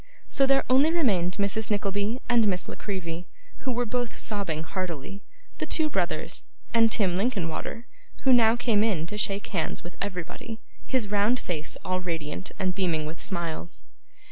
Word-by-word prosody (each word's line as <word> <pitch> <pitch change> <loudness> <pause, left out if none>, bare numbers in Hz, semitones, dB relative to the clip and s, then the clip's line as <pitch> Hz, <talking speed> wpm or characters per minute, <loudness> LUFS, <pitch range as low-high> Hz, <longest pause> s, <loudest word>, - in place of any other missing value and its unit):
So 270 -2 +3
there 270 0 +5
only 275 +5 +5
remained 200 - +2
Mrs 200 +2 0
Nickleby 205 +2 0
and 235 -3 +5
Miss 180 -3 +1
La - - -5
Creevy, 175 -4 -4 0.3
who 260 - -1
were 245 0 0
both 245 +1 -2
sobbing 190 -7 -2
heartily; 185 +1 -4 0.4
the - - -2
two 315 -2 +2
brothers; 170 - -1 0.3
and 225 -1 +5
Tim 190 -6 +2
Linkinwater, 205 0 -1 0.4
who 265 - +6
now 230 -2 +6
came 230 -4 +3
in 190 -8 +1
to 210 +5 -5
shake 200 0 0
hands 175 -6 -1
with 175 - -9
everybody: 200 +4 -4 0.3
his 250 -6 +1
round 210 +4 +3
face 160 -3 -3
all 185 0 +1
radiant 165 -1 -3
and 185 -2 +1
beaming 175 -5 +1
with 155 +2 -6
smiles. 165 - -2
200 Hz, 165 wpm, -27 LUFS, 175-230 Hz, 0.4 s, who